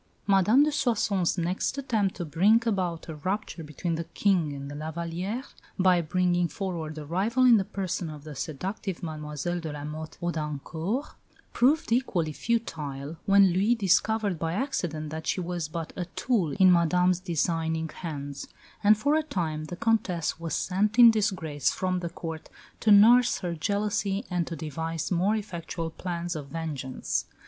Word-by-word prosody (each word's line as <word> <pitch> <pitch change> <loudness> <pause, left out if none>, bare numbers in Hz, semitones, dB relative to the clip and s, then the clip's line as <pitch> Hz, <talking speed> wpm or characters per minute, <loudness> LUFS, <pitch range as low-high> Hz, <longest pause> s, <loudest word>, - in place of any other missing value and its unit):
Madame 200 +7 +5
de 300 - +2
Soissons' 205 - +1
next 180 +9 -1
attempt 220 -8 0
to 175 - -4
bring 190 +9 +4
about 180 -6 -1
a 160 - -5
rupture 185 +1 -3
between 155 +3 -3
the 165 +1 -2
King 170 -2 +1
and 140 -1 -6
La 155 +1 -4
Vallière, 175 - -4 0.2
by 185 -2 +4
bringing 175 +1 +1
forward 170 -6 -4
a 150 - -6
rival 210 - +1
in 240 -3 +8
the 195 - +1
person 190 -4 -3
of 150 -2 -9
the 155 -1 -8
seductive 180 +7 -4
Mlle 150 -2 -5 0.3
de 160 -2 -5
la 145 -1 -6
Motte 155 +1 -7
Houdancourt, 165 - -3 0.4
proved 275 +2 +2
equally 180 -10 +1
futile, 155 -10 -3
when 195 -2 +6
Louis 205 +6 +3
discovered 210 -2 +1
by 165 0 -1
accident 175 - -2
that 160 0 -6
she - - 0
was 175 -2 -3
but 165 0 -6
a 180 - -3
tool 210 - +1
in 185 +4 +6
Madame's 180 +1 +3
designing 165 -2 -1
hands; 145 -5 -6 0.4
and 210 +1 +6
for 285 +7 +1
a 315 - +3
time 160 - -3
the 175 - -6
Comtesse 180 -7 0
was 165 -1 -3
sent 205 +4 0
in 235 -2 +10
disgrace 185 - 0
from 185 -1 -1
the 170 -1 -4
Court 160 -2 -7 0.3
to 220 - +1
nurse 230 +4 +7
her 175 -3 -2
jealousy 200 +3 -1
and 175 -2 0
to 165 - -4
devise 160 +1 -4
more 185 +5 +2
effectual 170 -5 -4
plans 175 0 -4
of 145 -3 -6
vengeance. 140 -4 -3
175 Hz, 165 wpm, -27 LUFS, 160-205 Hz, 0.4 s, in